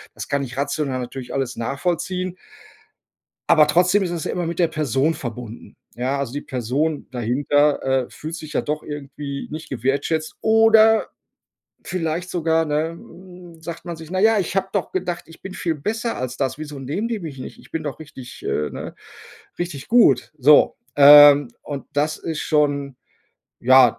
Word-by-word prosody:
das - - -7
kann 140 0 0
ich 125 0 -8
rational 140 -2 -1
natürlich 125 0 -7
alles 130 -2 -2
nachvollziehen. 180 +8 -2 1.1
Aber 150 -1 +6
trotzdem 180 +6 +3
ist 175 - -2
es 170 -3 -3
ja - - -3
immer 175 -2 -2
mit 170 +1 -4
der 170 -2 +3
Person 155 +1 0
verbunden. 120 -2 -8 0.2
Ja, 130 +3 -1
also 135 -3 -3
die 145 - -3
Person 135 +5 -2
dahinter, 140 +5 +1 0.2
äh, - - -23
fühlt 155 +2 -7
sich 155 -2 -8
ja - - +2
doch 150 0 -3
irgendwie 140 -1 -7
nicht 155 +1 -7
gewertschätzt 140 +5 -1
oder 225 0 +5 0.8
vielleicht 170 0 -3
sogar 165 -2 +1
ne, 155 +2 0
hm, 175 0 -14
sagt 170 +1 -7
man 170 -2 -6
sich: 160 +1 -11
„Naja, 210 +3 +3
ich 185 0 -2
habe 190 0 +1
doch 200 -4 -2
gedacht, 175 -2 -3
ich 165 - -16
bin 190 -1 -8
viel 165 -2 -2
besser 225 - -3
als 130 0 -4
das. 135 0 -2
Wieso 150 -2 -7
nehmen 170 - -3
die 225 -4 -3
mich 150 -5 -7
nicht? 130 - -9
Ich - - -18
bin 160 - -3
doch 145 0 -5
richtig, 130 -5 -11
äh, 75 -1 -1
ne - - -7 0.6
richtig 170 -6 -5
gut.“ 240 -7 +4
So, 145 +2 +5 0.2
ähm, 145 -1 +9
und 140 -2 -6
das 150 +2 0
ist 160 -2 -4
schon 145 -3 0 0.6
ja, 130 -1 +6
150 Hz, 175 wpm, -21 LUFS, 140-175 Hz, 1.1 s, ähm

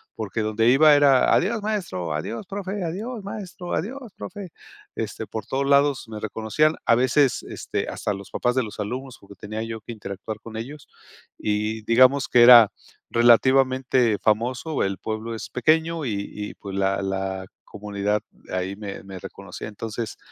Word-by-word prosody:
porque 110 0 -3
donde 110 +1 +1
iba 150 +4 +7
era: 140 -3 +5
"adiós 215 +4 +2
maestro", 175 - -3
"adiós 95 - -4
profe", 200 0 -4
"adiós 205 +6 -4
maestro", 185 -4 -6
"adiós 245 +3 -4
profe". 200 -4 -8 0.4
Este, - - -4
por 110 -2 -5
todos 135 +4 -1
lados 140 -1 +3
me 110 -1 -6
reconocían 110 +9 0
a - - +5
veces, 130 +2 +3
este, - - -4
hasta 105 - -2
los 100 0 -9
papás 125 - 0
de 130 - +2
los 105 -1 -9
alumnos 125 +5 -5
porque 100 0 -15
tenía 110 +3 -5
yo 115 0 -5
que 120 - -9
interactuar 105 +1 -7
con 110 0 -10
ellos 135 +6 -8 0.5
y 105 +1 -1
digamos 130 +5 +4
que 120 -1 +6
era 120 -3 +9 0.4
relativamente 130 -1 +4
famoso, 125 +8 0
el 95 0 -1
pueblo 110 +1 -4
es 110 - -7
pequeño 160 +5 +1
y 110 - -1 0.2
y 105 0 -6
pues 100 -1 -8
la 95 0 +1
la 95 -1 -3 0.3
comunidad 105 0 -2 0.3
ahí 95 +1 -2
me 100 -1 -7
me 95 -1 -9
reconocía. 100 +2 -9
Entonces, 110 +1 -5
115 Hz, 160 wpm, -24 LUFS, 105-145 Hz, 0.5 s, era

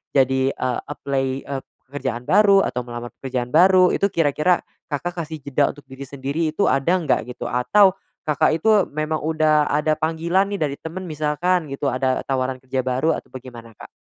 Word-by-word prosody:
jadi 130 0 +3
eee, 125 -2 -2
apply, 140 -2 -2 0.2
eee, 140 -1 -4 0.3
pekerjaan 130 -3 -4
baru, 200 -2 +5
atau 125 - -2
melamar 120 0 -7
pekerjaan 125 -2 -3
baru, 185 +2 +6
itu 200 - +2
kira-kira, 165 +2 +2 0.3
Kakak, 175 +5 -3
kasih 155 0 -8
jeda 145 +1 +1
untuk 145 - -16
diri 135 +1 -9
sendiri 140 +4 -2
itu 180 +6 -1
ada 135 +7 +2
enggak, 160 - 0
gitu 125 - -7
atau 190 - +4 0.4
Kakak, 155 +1 +2
itu 195 +7 +1 0.2
memang 155 +1 -2
udah 155 -1 +2
ada 150 +1 +1
panggilan 170 +4 +1
nih 200 - -3
dari 140 -2 -2
temen, 175 +4 -7
misalkan 155 +2 0
gitu 140 +1 -2
ada 130 +1 0
tawaran 130 -1 -1
kerja 130 0 -2
baru, 130 +5 +1
atau - - -8
bagaimana 120 -3 -11
Kak? - - -11
145 Hz, 175 wpm, -22 LUFS, 130-165 Hz, 0.4 s, baru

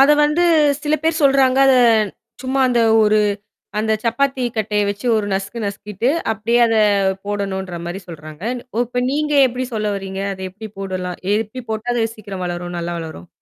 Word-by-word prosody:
அதை 280 +2 +7
வந்து 300 +4 +2 0.4
சில 300 0 +1
பேர் 320 0 +1
சொல்றாங்க 270 -2 +4
அதை 265 - +6 0.7
சும்மா 265 +1 -1
அந்த 240 -1 +2 0.2
ஒரு 215 0 +4 0.6
அந்தச் 220 0 0
சப்பாத்தி 260 +3 0
கட்டை 210 -1 0
வச்சு 205 +5 -4
ஒரு 210 -1 -1
நசுக்கு 195 +5 -3
நசுக்கிட்டு 205 +3 -3 0.2
அப்படியே 225 +2 0
அதைப் 200 -4 +2
போடணும்ன்ற 190 -3 -3
மாதிரி 175 +3 -5
சொல்றாங்க. 155 0 -10 0.3
ஒ - - 0
இப்ப 245 +1 -2
நீங்க 300 +1 0
எப்படி 250 +1 -3
சொல்ல 215 -1 -1
வர்றீங்க? 195 0 -5
அதை 190 0 -8
எப்படி 215 +4 -9
போடலாம்? 185 -2 -4 0.2
எப்படி 225 +4 -4
போட்டா 220 +3 -2
அது 235 - +1
சீக்கிரம் 195 -3 -7
வளரும், 175 0 -5
நல்லா 170 0 -3
வளரும்? 160 - -8
215 Hz, 165 wpm, -19 LUFS, 190-245 Hz, 0.7 s, அதை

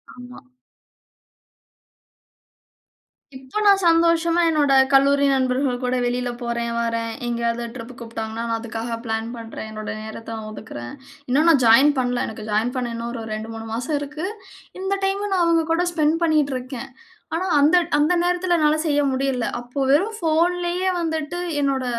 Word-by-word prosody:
ஆமா. 250 0 -11 3.0
இப்ப 260 +11 -5
நான் 400 -1 +6
சந்தோஷமா 335 0 +3
என்னோட 290 -3 +2 0.2
கல்லூரி 280 +1 +4
நண்பர்கள் 260 -1 +1
கூட 250 0 0
வெளில 245 0 -1
போறேன் 235 0 -2
வரேன். 230 0 -1 0.2
எங்கயாவது 235 0 -1
ட்ரிப் 245 0 -8
கூப்புட்டாங்கன்னா, 225 -1 -5
நான் 230 - 0
அதுக்காக 230 0 -4
பிளான் 225 0 -2
பண்றேன். 225 -1 -8
என்னோட 215 -1 -6
நேரத்த 220 +1 -8
நா 220 - -7
ஒதுக்குறேன். 120 - -8 0.4
இன்னும் 300 +6 +3
நான் 280 -6 +5
ஜாயின் 265 +6 +7
பண்ல. 245 -1 0
எனக்கு 220 -1 -8
ஜாயின் 220 +4 +1
பண்ண 245 -2 -2
இன்னும் 235 +1 -4
ஒரு 230 -2 -5
2,3 225 +1 -6
மாசம் 255 +6 -1
இருக்கு. 295 +5 -5 0.5
இந்த 390 +1 -1
டைம 400 +1 -1
நான் 370 -2 +2
அவுங்க 330 -1 +3
கூட 350 +2 +2
ஸ்பெண்ட் 310 -2 +2
பண்ணிட்ருக்கேன். 270 -6 -1 0.5
ஆனா 365 +3 -1
அந்த 305 +5 +5 0.2
அந்த 300 +4 +3
நேரத்தில 355 0 +1
என்னால 300 0 +3
செய்ய 290 -1 +2
முடியல. 260 -2 -1
அப்போ 245 +3 -9
வெறும் 420 +9 +2
ஃபோன்லயே 350 +2 +1
வந்துட்டு 320 +1 -3 0.2
என்னோட 270 -2 0
265 Hz, 145 wpm, -22 LUFS, 235-325 Hz, 3.0 s, ஜாயின்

